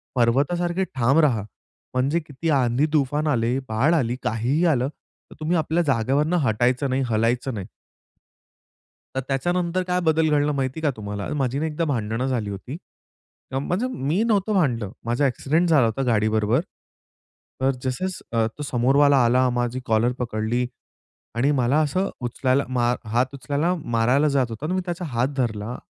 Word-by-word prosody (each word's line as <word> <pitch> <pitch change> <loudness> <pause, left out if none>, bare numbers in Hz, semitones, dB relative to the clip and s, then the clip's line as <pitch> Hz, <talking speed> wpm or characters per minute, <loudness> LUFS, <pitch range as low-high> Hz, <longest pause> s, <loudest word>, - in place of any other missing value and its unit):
पर्वतासारखे 170 +10 +1
ठाम 135 +4 +3
राहा. 115 -8 +1 0.5
म्हणजे 135 +6 +1
किती 155 0 -5
आंधी-तूफान 145 +2 +1
आले, 120 -3 +1
बाढ 125 +9 +2
आली, 125 -7 +1
काहीही 125 +10 0
आलं 135 -6 +2
तर - - -21
तुम्ही 160 +3 0
आपल्या 160 +2 +1
जागेवरून 140 +4 +1
हटायचं 130 -2 +1
नाही, 130 +1 0
हलायचं 115 +4 0
नाही. 100 -4 -5 1.5
तर - - +1
त्याच्यानंतर 175 +6 0
काय 180 0 +1
बदल 160 -1 +2
घडला 150 0 +2
माहिती 135 +1 -2
का 155 - +2
तुम्हाला? 105 -1 -5
माझी 135 -1 -1
नाही 160 +1 -1
एकदा 150 +3 -2
भांडणं 120 -3 -1
झाली 120 -6 -1
होती. 100 +9 -6 0.7
म्ह 135 - -1
म्हणजे 185 - -1
मी 165 - -1
नव्हतं 215 -2 +1
भांडलं. 120 - +1
माझा 120 +5 +2
एक्सिडेंट 155 +7 0
झाला 145 -7 +5
होता 115 +4 -1
गाडीबरोबर. 110 0 +2 1.0
तर 135 +1 +3
जसं-जसं 130 -5 -2
तो 150 - -5
समोरवाला 140 +2 +3
आला, 125 +2 +3
माझी 120 0 -1
कॉलर 115 +2 +2
पकडली 120 +1 -1 0.7
आणि 130 +5 +2
मला 135 +1 +2
असं 185 +7 0
उचलायला 130 +3 0
मा 120 -1 +1 0.2
हात 125 +3 +1
उचलायला 145 +5 -1 0.2
मारायला 125 +6 +3
जात 135 -2 +3
होता 115 +6 -6
आणि 180 +4 -1
मी 185 - 0
त्याचा 175 0 -4
हात 125 -4 0
धरला 115 -1 -2
135 Hz, 155 wpm, -23 LUFS, 120-155 Hz, 1.5 s, झाला